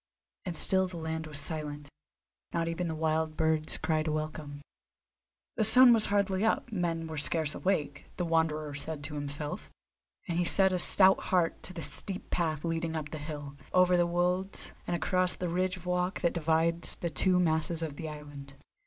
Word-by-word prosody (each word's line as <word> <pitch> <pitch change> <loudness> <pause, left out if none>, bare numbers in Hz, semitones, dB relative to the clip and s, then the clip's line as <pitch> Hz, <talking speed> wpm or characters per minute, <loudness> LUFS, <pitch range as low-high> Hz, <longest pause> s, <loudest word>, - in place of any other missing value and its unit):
And 175 -3 -2
still 190 0 +4
the 180 -1 -7
land 160 0 -4
was 150 -2 -3
silent; 150 -1 -1 0.6
not 165 -1 -1
even 165 +1 -2
the 160 - -3
wild 155 0 -1
birds 160 -1 +1
cried 155 -1 -1
a - - 0
welcome. 155 -1 -4 1.0
The 220 - +2
sun 245 +3 +8
was 220 -2 +4
hardly 200 -1 +1
up, 225 +2 0
men 170 -5 -2
were 160 -2 -5
scarce 155 0 0
awake, 150 -6 -2
the 180 - -1
Wanderer 155 -2 0
said 145 +1 -5
to 150 +1 -5
himself; 145 0 -5 0.6
and 170 0 -1
he - - +3
set 190 +2 +3
a 180 - 0
stout 190 +2 +5
heart 175 -3 +1
to 185 - -8
the 165 -3 -6
steep 195 -2 -4
path 160 -2 -1
leading 165 0 -2
up 150 -2 -4
the 155 - -5
hill, 145 -2 -7 0.2
over 180 0 +5
the 175 -1 +3
wolds, 180 +2 -1 0.2
and 175 - 0
across 185 +1 +1
the 180 - -3
ridge 185 +2 -1
of 180 - -13
rock 180 +1 -1
that 170 - +1
divides 165 +1 0
the 170 - -4
two 180 +5 +3
masses 165 -1 0
of 155 -3 -4
the 160 +1 -6
island. 145 -2 -10
165 Hz, 190 wpm, -30 LUFS, 155-180 Hz, 1.0 s, sun